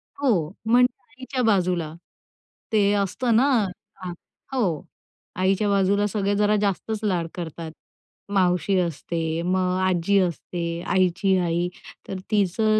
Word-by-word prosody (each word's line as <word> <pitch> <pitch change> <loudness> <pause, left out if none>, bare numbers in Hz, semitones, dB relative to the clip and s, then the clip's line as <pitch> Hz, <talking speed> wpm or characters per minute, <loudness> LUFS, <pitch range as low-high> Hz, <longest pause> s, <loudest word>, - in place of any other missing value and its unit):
हो, 220 - +1 0.2
म्हणजे 245 +2 +3
आईच्या 255 +2 -4
बाजूला. 180 -7 +1 0.8
ते 205 -2 +3
असतं 205 +4 +1
ना 260 +5 +5 0.5
हां, 180 -2 -6 0.4
हो. 190 - 0 0.5
आईच्या 195 +2 +2
बाजूला 200 +1 +3
सगळे 205 0 0
जरा 210 +1 +3
जास्तच 205 +2 -1
लाड 180 -5 0
करतात. 165 -2 -6 0.6
मावशी 185 0 +2
असते, 165 -1 -2
मग 185 +1 +1
आजी 185 +1 +2
असते. 170 -1 -2
आईची 185 +1 +3
आई. 175 0 0 0.4
तर 190 - -4
तिचं 215 +2 +2
190 Hz, 115 wpm, -24 LUFS, 175-210 Hz, 0.8 s, ना